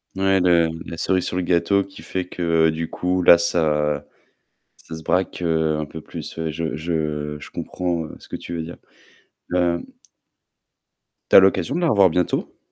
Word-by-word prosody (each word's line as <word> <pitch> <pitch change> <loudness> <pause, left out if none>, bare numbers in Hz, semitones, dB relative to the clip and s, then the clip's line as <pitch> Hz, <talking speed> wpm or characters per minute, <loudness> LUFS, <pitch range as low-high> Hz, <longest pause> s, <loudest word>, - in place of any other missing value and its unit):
Ouais, 95 0 +2
le 85 -2 +4 0.2
la 85 - -7
cerise 90 +1 0
sur - - -3
le 90 - 0
gâteau 95 +3 +2
qui 95 0 -14
fait 95 -1 -4
que 85 -2 +2
du 80 +1 -3
coup, 90 +1 -1
là, 85 -1 +8
ça 75 -3 0 0.7
ça 80 - -10
se 80 - -11
braque, 90 -1 0
heu, 80 -2 +1
un 75 - -3
peu 80 +2 -9
plus. - - -8
Ouais, 80 -1 -2
je 80 -2 -3
je 75 -2 -3
je - - -11
comprends, 85 -3 -3
heu, - - -10
ce - - -16
que - - -6
tu 85 - -7
veux 80 - -3
dire. 85 +2 -9 0.8
Hem 85 -1 +1 1.5
Tu - - +4
as - - +13
l'occasion 95 - +2
de 175 - -1
la 170 - +2
revoir 100 -3 +5
bientôt? 90 +2 -1
85 Hz, 190 wpm, -22 LUFS, 80-90 Hz, 1.5 s, as